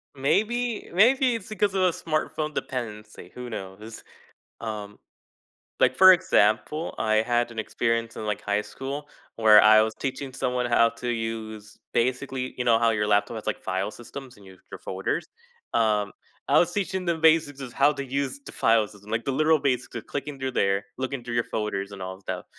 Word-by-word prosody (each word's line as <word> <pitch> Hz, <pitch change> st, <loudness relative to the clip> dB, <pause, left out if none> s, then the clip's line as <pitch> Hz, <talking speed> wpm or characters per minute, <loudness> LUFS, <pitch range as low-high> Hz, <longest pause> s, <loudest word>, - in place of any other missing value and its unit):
Maybe 220 Hz, -, 0 dB
maybe 250 Hz, +6 st, +4 dB
it's 225 Hz, -, -7 dB
because 210 Hz, -2 st, 0 dB
of 190 Hz, -1 st, +1 dB
the 180 Hz, -, +4 dB
smartphone 155 Hz, -1 st, -2 dB
dependency, 105 Hz, -9 st, -6 dB
who 125 Hz, 0 st, -7 dB
knows? 105 Hz, +1 st, -8 dB, 0.6 s
Um, 105 Hz, -2 st, -6 dB, 0.8 s
like, -, -, +4 dB
for 190 Hz, 0 st, +9 dB
example, 165 Hz, -3 st, +1 dB
I 110 Hz, -1 st, +1 dB
had 120 Hz, +2 st, +1 dB
an 115 Hz, -, -10 dB
experience 115 Hz, +1 st, -1 dB
in, -, -, -5 dB
like, 105 Hz, -1 st, -2 dB
high 105 Hz, 0 st, 0 dB
school 140 Hz, +6 st, -6 dB, 0.3 s
where 110 Hz, -2 st, +7 dB
I 110 Hz, +1 st, +7 dB
was 110 Hz, 0 st, -2 dB
teaching 135 Hz, 0 st, -4 dB
someone 125 Hz, -1 st, -1 dB
how 115 Hz, -1 st, +4 dB
to 115 Hz, +1 st, -7 dB
use, 110 Hz, -2 st, -4 dB, 0.2 s
basically 130 Hz, +1 st, -1 dB
you 125 Hz, -, -2 dB
know 115 Hz, -2 st, +4 dB
how 115 Hz, 0 st, +3 dB
your 105 Hz, -2 st, 0 dB
laptop 105 Hz, +2 st, +2 dB
has 110 Hz, -, -8 dB
like 110 Hz, -, -2 dB
file 95 Hz, +2 st, -2 dB
systems 125 Hz, +3 st, -10 dB
and 100 Hz, -1 st, -17 dB
you 95 Hz, -1 st, -14 dB
your -, -, -8 dB
folders, 95 Hz, -, -3 dB, 0.5 s
um, 105 Hz, -3 st, +2 dB, 0.4 s
I -, -, +5 dB
was 175 Hz, 0 st, +3 dB
teaching 190 Hz, -1 st, -2 dB
them 170 Hz, -2 st, 0 dB
basics 155 Hz, -3 st, +3 dB
of 130 Hz, -3 st, -7 dB
how 140 Hz, +4 st, +4 dB
to 140 Hz, 0 st, -4 dB
use 135 Hz, +1 st, -3 dB
the -, -, -8 dB
file 115 Hz, -1 st, +3 dB
system, 105 Hz, 0 st, -15 dB
like 115 Hz, +1 st, -1 dB
the 135 Hz, -, -1 dB
literal 155 Hz, +3 st, +3 dB
basics 130 Hz, -3 st, -1 dB
of 115 Hz, -, -6 dB
clicking 145 Hz, 0 st, -5 dB
through 130 Hz, 0 st, -3 dB
there, 100 Hz, -3 st, +1 dB
looking 130 Hz, 0 st, -3 dB
through 120 Hz, -1 st, -5 dB
your 120 Hz, -, +1 dB
folders 100 Hz, -2 st, -3 dB
and 100 Hz, -, -9 dB
all 95 Hz, 0 st, -5 dB
of 95 Hz, +1 st, -18 dB
that, -, -, -4 dB
120 Hz, 195 wpm, -25 LUFS, 110-145 Hz, 0.8 s, for